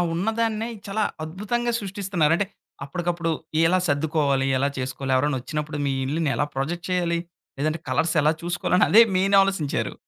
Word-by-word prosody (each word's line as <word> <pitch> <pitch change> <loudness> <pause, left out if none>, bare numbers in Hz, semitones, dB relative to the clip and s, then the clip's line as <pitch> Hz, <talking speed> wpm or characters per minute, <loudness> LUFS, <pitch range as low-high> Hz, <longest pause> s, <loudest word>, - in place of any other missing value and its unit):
ఉన్నదాన్నే 225 +4 -1 0.2
చాలా 210 +1 0 0.2
అద్భుతంగా 225 +8 -2
సృష్టిస్తున్నారు. 190 -5 0
అంటే 205 - 0 0.4
అప్పటికప్పుడు 170 +2 -2 0.4
ఎలా 185 +2 +3
సర్దుకోవాలి, 145 -2 +1
ఎలా 140 +2 +2
చేసుకోవాలి, 130 +1 -3
ఎవరన్నొచ్చినప్పుడు 150 +2 -2
మీ 135 - +1
ఇల్లుని 155 +1 0
ఎలా 145 - +1
ప్రొజెక్ట్ 165 +7 -3
చేయాలి, 175 -2 +1 0.4
లేదంటే 155 +3 -1
కలర్సెలా 155 -2 +2
చూసుకోవాలని, 175 +1 +2
అదే 220 - +8 0.2
మెయిన్ 195 +1 +3
ఆలోసించారు. 190 -7 -1
170 Hz, 130 wpm, -24 LUFS, 145-195 Hz, 0.4 s, అదే